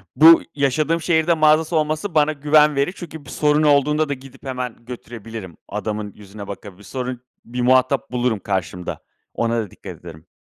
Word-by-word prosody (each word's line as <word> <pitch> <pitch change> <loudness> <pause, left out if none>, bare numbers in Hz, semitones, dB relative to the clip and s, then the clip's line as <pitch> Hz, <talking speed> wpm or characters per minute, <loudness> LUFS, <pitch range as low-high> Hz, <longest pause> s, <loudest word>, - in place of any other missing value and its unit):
Bu 165 +2 +8
yaşadığım 150 +4 +1
şehirde 165 0 +2
mağazası 155 +1 +3
olması 155 +4 -1
bana 155 0 +4
güven 150 +1 +4
verir. 140 +7 +1
Çünkü 160 -4 -9
bir - - -12
sorun 150 0 +2
olduğunda 150 +1 +3
da - - 0
gidip 135 -1 -13
hemen 125 -3 -5
götürebilirim. 115 -6 -8
Adamın 105 -1 -4
yüzüne 100 0 -11
bakabilir. 100 0 -9
Sorun 125 +2 -5 0.2
bir 125 +1 -4
muhatap 130 +2 +2
bulurum 125 -3 0
karşımda. 90 -2 -4 0.3
Ona 115 0 0
da 105 -5 -5
dikkat - - -10
ederim. 80 -2 -12
130 Hz, 160 wpm, -21 LUFS, 110-150 Hz, 0.3 s, Bu